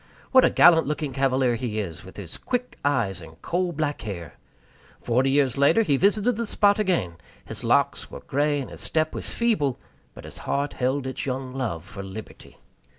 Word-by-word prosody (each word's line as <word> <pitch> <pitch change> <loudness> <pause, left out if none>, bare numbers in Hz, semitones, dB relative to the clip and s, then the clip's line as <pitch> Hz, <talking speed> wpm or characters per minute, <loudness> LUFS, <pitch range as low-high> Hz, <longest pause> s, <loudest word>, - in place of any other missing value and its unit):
What 260 -1 +7
a - - +5
gallant 165 -5 +6
looking 150 -2 -2
cavalier 130 -1 +2
he 115 -2 -3
is, 85 -7 -5
with 95 - -13
his 95 -5 -6
quick 250 0 -3
eyes 115 -10 0
and 80 0 -13
coal 175 +1 0
black 150 -2 -2
hair! 90 -7 -6 0.7
Forty 125 +3 +1
years 135 -1 +2
later 145 +11 +5
he 145 -9 +2
visited 205 - +2
the 235 -1 -2
spot 205 0 +3
again; 170 - 0 0.3
his - - -8
locks - - +1
were - - -9
gray 145 +1 0
and 135 - -6
his - - -8
step 155 0 0
was - - -4
feeble, 205 - +1 0.4
but - - -11
his - - -10
heart 140 +1 -2
held 130 +2 -1
its 130 +1 -4
young 130 0 -3
love 120 - -3
for 100 +1 -9
Liberty. 95 +3 -10
135 Hz, 190 wpm, -25 LUFS, 115-160 Hz, 0.7 s, What